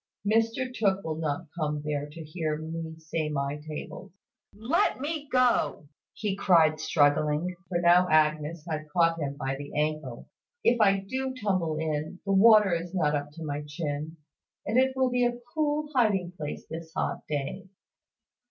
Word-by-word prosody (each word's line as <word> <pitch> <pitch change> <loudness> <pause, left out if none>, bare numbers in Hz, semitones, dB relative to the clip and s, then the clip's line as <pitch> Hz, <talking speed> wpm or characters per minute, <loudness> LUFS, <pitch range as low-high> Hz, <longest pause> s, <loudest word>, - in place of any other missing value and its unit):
Mr 230 +4 +1
Tooke 195 -4 +1
will 155 -1 -3
not 160 +1 -2
come 150 -3 -2
there 145 -1 -2
to 160 +2 -9
hear 155 -1 -3
me 160 +1 -6
say 160 -1 -3
my 140 -1 -2
tables. 155 +5 -8 0.4
Let 230 +11 +1
me 295 0 -4
go!" 250 - +2 0.3
he 210 -4 -2
cried, 165 -5 +4
struggling, 150 +3 +2
for 175 - 0
now 175 +1 +5
Agnes 155 +1 +2
had 155 -2 -4
caught 165 0 +3
him 140 -2 -3
by 135 -1 -2
the 145 +1 -5
ankle. 150 -5 -2 0.4
"If 235 -1 +3
I 195 -2 +4
do 260 +2 -2
tumble 185 -7 0
in, 155 +2 -3
the 195 - -1
water 210 -1 +7
is 170 +2 -3
not 150 -5 +2
up 145 0 -2
to 165 - -8
my 145 0 -3
chin, 150 +1 -4 0.5
and 225 +5 +2
it 265 0 +2
will 260 -1 +2
be 250 0 +2
a 240 0 +1 0.2
cool 300 -1 0
hiding 205 -8 +2
place 150 -4 -6
this 160 0 -7
hot - - -1
day." 150 +6 -3
165 Hz, 165 wpm, -28 LUFS, 150-205 Hz, 0.5 s, water